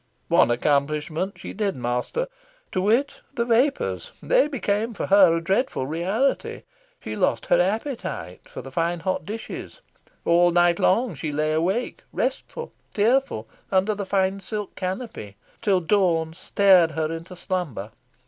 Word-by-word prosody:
One -, -, +5 dB
accomplishment 150 Hz, +8 st, 0 dB
she -, -, -8 dB
did 200 Hz, -1 st, -1 dB
master 125 Hz, -, -2 dB, 0.5 s
to 185 Hz, -, 0 dB
wit, 230 Hz, +8 st, +1 dB
the 235 Hz, -2 st, 0 dB
vapours: 250 Hz, +5 st, +1 dB
they -, -, +3 dB
became 225 Hz, -5 st, -1 dB
for -, -, -2 dB
her 190 Hz, -4 st, +6 dB
a 165 Hz, -, -1 dB
dreadful 195 Hz, -, 0 dB
reality. 190 Hz, -, -1 dB, 0.4 s
She -, -, -4 dB
lost -, -, +1 dB
her -, -, +4 dB
appetite 205 Hz, -, -3 dB
for -, -, -8 dB
the 135 Hz, -, -9 dB
fine 170 Hz, +3 st, -1 dB
hot 185 Hz, +2 st, -2 dB
dishes. 220 Hz, +2 st, -7 dB, 0.5 s
All 175 Hz, +1 st, +5 dB
night 175 Hz, 0 st, +3 dB
long 230 Hz, +2 st, +2 dB
she 150 Hz, +1 st, -4 dB
lay 155 Hz, +1 st, 0 dB
awake, 185 Hz, +10 st, -1 dB
restless, 475 Hz, -, -3 dB, 0.2 s
tearful, 220 Hz, -, +2 dB, 0.2 s
under 195 Hz, +2 st, +3 dB
the 200 Hz, -2 st, -5 dB
fine 195 Hz, 0 st, +1 dB
silk 210 Hz, +1 st, -5 dB
canopy, 185 Hz, -, -5 dB, 0.3 s
till 200 Hz, -5 st, +3 dB
dawn 165 Hz, -3 st, +2 dB
stared 180 Hz, -2 st, +4 dB
her 160 Hz, 0 st, -1 dB
into 165 Hz, +3 st, -7 dB
slumber. 170 Hz, -, -3 dB
185 Hz, 145 wpm, -24 LUFS, 160-220 Hz, 0.5 s, her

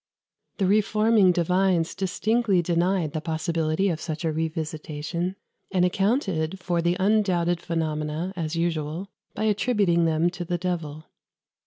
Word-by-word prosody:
The 195 Hz, -, +1 dB
reforming 215 Hz, 0 st, +4 dB
divines 180 Hz, 0 st, +1 dB
distinctly 200 Hz, 0 st, +1 dB
denied 170 Hz, -1 st, +1 dB
the 155 Hz, -, -2 dB
possibility 160 Hz, +2 st, 0 dB
of 165 Hz, -4 st, -1 dB
such 155 Hz, +1 st, -4 dB
a 160 Hz, -, 0 dB
revisitation, 160 Hz, +2 st, -3 dB, 0.4 s
and 180 Hz, -2 st, +3 dB
accounted 190 Hz, -, 0 dB
for 175 Hz, -2 st, -1 dB
the 175 Hz, +1 st, +1 dB
undoubted 185 Hz, -4 st, +2 dB
phenomena, 160 Hz, +1 st, -2 dB
as 165 Hz, -2 st, -3 dB
usual, 165 Hz, +2 st, -2 dB, 0.3 s
by -, -, -2 dB
attributing 205 Hz, -5 st, +2 dB
them 165 Hz, +2 st, +2 dB
to 175 Hz, -1 st, -5 dB
the 175 Hz, +1 st, -2 dB
devil. 165 Hz, -4 st, -4 dB
175 Hz, 130 wpm, -25 LUFS, 160-190 Hz, 0.4 s, reforming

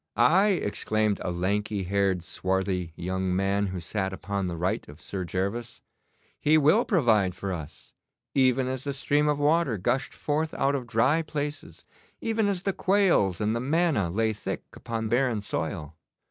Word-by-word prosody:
'Aye,' 180 Hz, -, +4 dB
exclaimed 105 Hz, 0 st, 0 dB
a -, -, -2 dB
lanky 100 Hz, +3 st, -1 dB
haired, 95 Hz, -1 st, +1 dB
swarthy 95 Hz, -1 st, -1 dB
young 95 Hz, +1 st, -2 dB
man 100 Hz, +1 st, +1 dB
who 95 Hz, -1 st, -4 dB
sat 95 Hz, +3 st, -2 dB
upon 100 Hz, 0 st, -3 dB
the 85 Hz, -1 st, -4 dB
right 95 Hz, +4 st, -2 dB
of 75 Hz, +1 st, -12 dB
Sir 95 Hz, +1 st, -4 dB
Gervas, 100 Hz, +7 st, -3 dB, 0.6 s
'he 155 Hz, +1 st, +4 dB
will 155 Hz, -, +4 dB
provide 110 Hz, -, +3 dB
for 95 Hz, 0 st, -3 dB
us, 80 Hz, -5 st, -9 dB, 0.4 s
even 130 Hz, -1 st, +3 dB
as 130 Hz, 0 st, -3 dB
the 140 Hz, -, -2 dB
stream 145 Hz, +2 st, +1 dB
of 150 Hz, -, +1 dB
water 145 Hz, -4 st, +2 dB
gushed 130 Hz, +8 st, -1 dB
forth 155 Hz, +2 st, -1 dB
out 140 Hz, +1 st, +1 dB
of 130 Hz, -4 st, -3 dB
dry 130 Hz, +8 st, +3 dB
places, 150 Hz, -1 st, -5 dB, 0.3 s
even 225 Hz, -2 st, 0 dB
as 195 Hz, -3 st, -1 dB
the 195 Hz, -, 0 dB
quails 185 Hz, -, +2 dB
and 105 Hz, +2 st, 0 dB
the -, -, 0 dB
manna 140 Hz, -, +1 dB
lay 110 Hz, +4 st, +1 dB
thick 105 Hz, -, -5 dB
upon 115 Hz, -1 st, -4 dB
barren 120 Hz, 0 st, +1 dB
soil. 80 Hz, -5 st, -4 dB
110 Hz, 165 wpm, -27 LUFS, 95-145 Hz, 0.6 s, Aye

